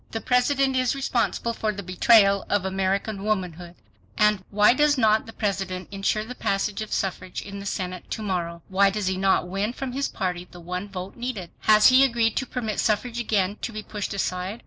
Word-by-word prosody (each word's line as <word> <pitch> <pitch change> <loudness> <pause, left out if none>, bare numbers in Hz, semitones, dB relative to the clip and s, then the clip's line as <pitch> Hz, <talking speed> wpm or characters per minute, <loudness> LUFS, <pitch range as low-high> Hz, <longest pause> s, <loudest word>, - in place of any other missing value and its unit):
THE 225 - -4
PRESIDENT 265 +3 +2
IS 255 0 +1
RESPONSIBLE 240 -3 -1
FOR 220 -1 -1
THE 200 -1 -7
BETRAYAL 200 +2 +4
OF 200 -2 +1
AMERICAN 195 +2 -1
WOMANHOOD. 180 -5 -3 0.4
And— 210 -3 +3
WHY 210 +2 +5
DOES 295 +2 +3
NOT 220 -3 +3
THE 225 - -10
PRESIDENT 190 -3 -3
INSURE 200 +2 -1
THE 250 - -7
PASSAGE 200 -2 -1
OF 215 - -6
SUFFRAGE 185 -1 -3
IN 200 0 -8
THE 200 - -6
SENATE 185 -2 -4
TO 220 - -4
MORROW? 170 -4 -3
WHY 195 +1 +4
DOES 205 0 -3
HE 185 0 0
NOT 190 -1 +2
WIN 200 +5 -2
FROM 265 0 -5
HIS 275 +2 -1
PARTY 180 -1 -3
THE 175 - -12
ONE 180 +3 -5
VOTE 185 0 -7
NEEDED? 235 -8 -5
HAS 215 0 +6
HE 260 +1 +6
AGREED 230 -4 +2
TO 265 - -1
PERMIT 220 -5 -3
SUFFRAGE 230 +3 0
AGAIN 205 -3 0
TO - - -3
BE 215 -1 -6
PUSHED 205 -2 -5
ASIDE? 185 +2 -3
205 Hz, 200 wpm, -25 LUFS, 190-225 Hz, 0.4 s, HAS